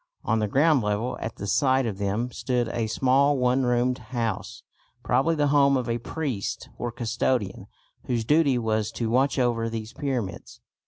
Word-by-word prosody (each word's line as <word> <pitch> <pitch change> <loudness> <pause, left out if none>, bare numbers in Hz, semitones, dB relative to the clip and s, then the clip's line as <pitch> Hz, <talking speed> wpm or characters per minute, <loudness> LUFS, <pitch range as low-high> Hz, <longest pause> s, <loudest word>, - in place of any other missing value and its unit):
On 110 0 +1
the 105 - 0
ground 145 +5 +3
level 105 +3 -1
at 110 - -5
the - - -6
side 130 +4 +2
of 105 -4 -4
them 105 +5 -1
stood 125 -2 -1
a 115 -2 -2
small 135 +5 +3
one 125 +1 +2
roomed 125 +1 +1
house, 115 -6 -4 0.4
probably 135 +7 +2
the 145 -2 +1
home 140 -1 +5
of 125 -2 -3
a 115 0 -1
priest 125 -4 -4
or 120 - -2
custodian 115 -3 -1 0.4
whose 120 -3 -1
duty 145 -1 +3
was 110 -2 0
to 115 -2 -2
watch 135 +4 +2
over 120 -3 +1
these 110 -1 -6
pyramids. 125 -9 -4
120 Hz, 170 wpm, -25 LUFS, 110-135 Hz, 0.4 s, home